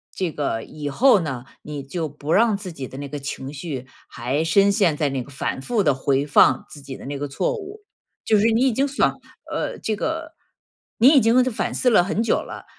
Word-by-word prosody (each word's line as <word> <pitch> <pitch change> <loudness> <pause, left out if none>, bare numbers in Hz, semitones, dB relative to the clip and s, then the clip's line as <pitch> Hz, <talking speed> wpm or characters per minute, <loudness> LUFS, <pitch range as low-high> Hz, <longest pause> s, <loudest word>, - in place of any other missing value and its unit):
这 185 -3 -1
个， 140 -7 -2
以 150 -1 -7
后 230 - +4
呢， 135 -6 -5 0.2
你 150 -1 -6
就 160 +4 -4
不 145 +1 -6
让 220 +3 +4
自 195 -2 -7
己 140 -5 -7
的 130 - -9
那 140 - -5
个 145 - -5
情 135 -1 -6
绪 140 -4 -6 0.2
还 130 +6 -2
深 195 +5 +4
陷 195 -6 +2
在 150 -1 0
那 135 -2 -3
个 140 - -15
反 135 - -3
复 220 - 0
地 150 -6 +3
回 135 +1 +1
放 135 -2 +5
自 150 - -11
己 135 -1 -8
的 - - -11
那 140 0 -4
个 145 +1 -3
错 135 - -1
误。 420 -1 -9 0.4
就 215 - +3
是 205 - +2
你 225 +2 +2
已 - - +3
经 270 +5 +1
想 280 - 0 0.3
呃， - - -3
这 220 - -2
个， 320 +7 -4 0.7
你 235 - +7
已 290 -2 +7
经 240 +2 +4
反 255 -4 -2
思 250 - +2
了 215 -7 +5
很 195 +4 -1
久 230 - +2
了， - - -6
160 Hz, 245 characters per minute, -22 LUFS, 140-225 Hz, 0.7 s, 你